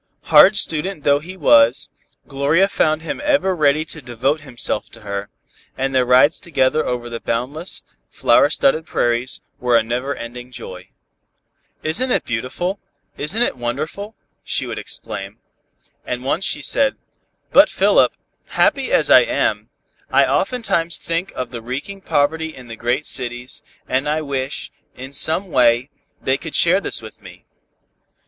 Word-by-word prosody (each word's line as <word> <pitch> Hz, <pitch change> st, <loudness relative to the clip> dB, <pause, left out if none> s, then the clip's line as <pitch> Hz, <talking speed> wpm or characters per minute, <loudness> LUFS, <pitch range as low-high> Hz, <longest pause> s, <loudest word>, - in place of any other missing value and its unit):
Hard 205 Hz, -, +8 dB
student 165 Hz, -3 st, -1 dB
though 145 Hz, 0 st, +4 dB
he 180 Hz, +5 st, -10 dB
was, 115 Hz, -7 st, +4 dB, 0.4 s
Gloria 145 Hz, +7 st, +2 dB
found 155 Hz, -4 st, 0 dB
him 165 Hz, -, -4 dB
ever 280 Hz, -11 st, +2 dB
ready 155 Hz, -1 st, +2 dB
to 160 Hz, -1 st, -9 dB
devote 130 Hz, +4 st, -1 dB
himself 120 Hz, -6 st, -3 dB
to 115 Hz, -, -14 dB
her, 100 Hz, -1 st, -5 dB, 0.5 s
and 135 Hz, +1 st, -1 dB
their 130 Hz, -1 st, +2 dB
rides 130 Hz, +5 st, +5 dB
together 155 Hz, -2 st, +1 dB
over 120 Hz, -1 st, -3 dB
the 115 Hz, -1 st, -6 dB
boundless, 130 Hz, +11 st, -4 dB, 0.3 s
flower -, -, +3 dB
studded 160 Hz, -, +2 dB
prairies, 120 Hz, +2 st, -1 dB, 0.2 s
were 125 Hz, -1 st, +3 dB
a 115 Hz, -, +2 dB
never 125 Hz, +5 st, -2 dB
ending 120 Hz, +2 st, -9 dB
joy. 95 Hz, -6 st, -9 dB, 0.9 s
"Isn't 210 Hz, +12 st, 0 dB
it -, -, +1 dB
beautiful 130 Hz, -, -3 dB, 0.4 s
Isn't 190 Hz, +11 st, 0 dB
it -, -, -1 dB
wonderful," 155 Hz, -, -4 dB, 0.3 s
she -, -, -2 dB
would -, -, -5 dB
exclaim. 100 Hz, +2 st, -7 dB, 0.7 s
And 125 Hz, 0 st, -4 dB
once 170 Hz, +7 st, 0 dB
she -, -, -2 dB
said, 275 Hz, -1 st, +1 dB, 0.5 s
"But, -, -, +7 dB
Philip, -, -, +3 dB, 0.4 s
happy -, -, +1 dB
as -, -, +2 dB
I -, -, +9 dB
am, -, -, -1 dB, 0.4 s
I -, -, +4 dB
oftentimes 195 Hz, -9 st, 0 dB
think 170 Hz, +3 st, -3 dB
of 125 Hz, -2 st, -4 dB
the 120 Hz, -2 st, -6 dB
reeking 135 Hz, +12 st, -6 dB
poverty 160 Hz, +1 st, 0 dB
in 125 Hz, -2 st, -13 dB
the 115 Hz, -, -6 dB
great 120 Hz, +6 st, -1 dB
cities, 120 Hz, -1 st, -4 dB, 0.3 s
and 130 Hz, +3 st, 0 dB, 0.2 s
wish, 135 Hz, 0 st, -3 dB, 0.2 s
in 130 Hz, +2 st, -9 dB
some 160 Hz, +7 st, +1 dB
way, 125 Hz, +1 st, +3 dB, 0.3 s
they 135 Hz, +1 st, 0 dB
could 165 Hz, -2 st, -6 dB
share 180 Hz, +4 st, +4 dB
this -, -, -1 dB
with -, -, -12 dB
me." -, -, -14 dB
140 Hz, 150 wpm, -19 LUFS, 120-165 Hz, 0.9 s, I